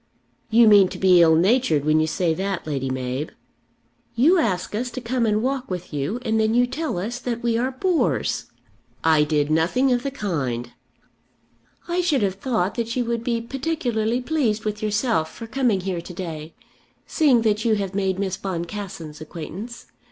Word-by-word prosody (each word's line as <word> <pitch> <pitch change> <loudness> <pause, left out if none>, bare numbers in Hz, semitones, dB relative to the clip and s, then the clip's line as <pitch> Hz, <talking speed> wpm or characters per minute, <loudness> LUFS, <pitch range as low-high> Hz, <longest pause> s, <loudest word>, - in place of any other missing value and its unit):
"You 230 +1 +6
mean 205 -3 +7
to - - -8
be 185 -2 +5
ill 160 -1 +6
natured 175 - +2
when 155 +1 +4
you 155 - +2
say 165 +1 0
that, 190 +1 -3
Lady 135 -3 -2
Mab." 130 +3 -3 0.9
"You 320 +10 +5
ask 185 - -1
us 240 +4 -2
to 255 - -6
come 240 -1 0
and 215 +1 +1
walk 265 0 -2
with 180 -3 -5
you, 145 - -2
and 220 -2 +1
then 220 +1 +2
you 245 +1 +5
tell 280 - -3
us 225 +7 -3
that 240 -1 -4
we 235 -1 +1
are 245 +3 +1
bores!" 330 +7 0 0.6
"I 160 -2 +4
did 150 0 0
nothing 185 +12 +2
of 245 -1 +2
the 275 - -2
kind." 135 - -3 1.2
"I 350 +1 0
should 305 - +1
have 195 -2 +1
thought 220 -8 0
that 230 -1 -3
you 250 -1 0
would 235 0 -2
be 235 -1 -1
particularly 245 -3 -1
pleased 245 -7 0
with 210 0 -3
yourself 210 -6 0
for 230 - -8
coming 230 -5 0
here 180 -2 -3
to 180 - -10
day, 160 -3 -6 0.5
seeing 270 -8 +3
that 215 -1 +1
you 225 -2 +3
have 200 -2 -3
made 190 -1 0
Miss 190 -1 -2
Boncassen's 175 -4 -6
acquaintance. 180 +9 -8
210 Hz, 180 wpm, -23 LUFS, 170-245 Hz, 1.2 s, mean